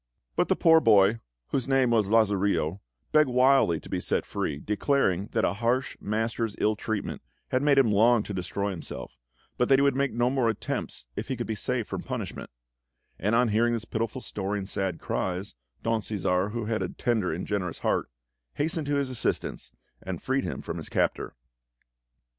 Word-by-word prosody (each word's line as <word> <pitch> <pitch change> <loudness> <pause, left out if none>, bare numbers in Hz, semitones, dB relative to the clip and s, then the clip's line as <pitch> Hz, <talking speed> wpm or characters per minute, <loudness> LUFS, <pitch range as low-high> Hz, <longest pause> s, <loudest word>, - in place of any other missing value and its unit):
But - - +2
the - - +3
poor 160 -1 +6
boy, 105 -2 +5 0.3
whose 130 -2 -1
name 135 -2 +3
was 110 -4 +2
Lazarillo, 100 -5 +2 0.3
begged 155 -3 +5
wildly 125 -9 +4
to - - -12
be - - -2
set - - 0
free, 70 - -3
declaring 105 - +1
that - - +2
a - - +1
harsh 120 +5 0
master's 115 +1 -2
ill 110 0 +2
treatment 105 -1 -3 0.3
had 130 - +1
made 145 -1 +4
him 130 -6 +5
long 110 +2 +4
to 105 - -6
destroy 100 +2 -2
himself, 90 -4 -7 0.4
but 125 - +2
that 135 - +7
he 140 - +3
would 140 -2 +3
make 140 0 +1
no 120 +2 +1
more 130 -4 +2
attempts 110 - -4
if - - -4
he 130 - -2
could 120 - -3
be 110 - -2
saved 105 - -2
from - - -4
punishment; - - -5 0.7
and 105 +4 +1
on 125 0 +4
hearing 115 +3 +2
his 115 -1 -2
pitiful 115 +3 -3
story 100 -2 -3
and 95 -1 -5
sad 95 -5 -1
cries, 95 +2 -3 0.3
Don 115 -1 +1
Cæsar, 95 -1 0
who 115 -1 -3
had 110 0 -1
a - - -1
tender 110 -7 0
and 85 +4 -3
generous 95 -5 -2
heart, - - 0 0.5
hastened 155 0 -1
to 145 - +1
his 140 -2 0
assistance - - -2 0.3
and 95 -3 -5
freed 135 +1 -1
him - - -4
from - - -4
his - - -6
captor. - - -1
110 Hz, 190 wpm, -27 LUFS, 100-130 Hz, 0.7 s, that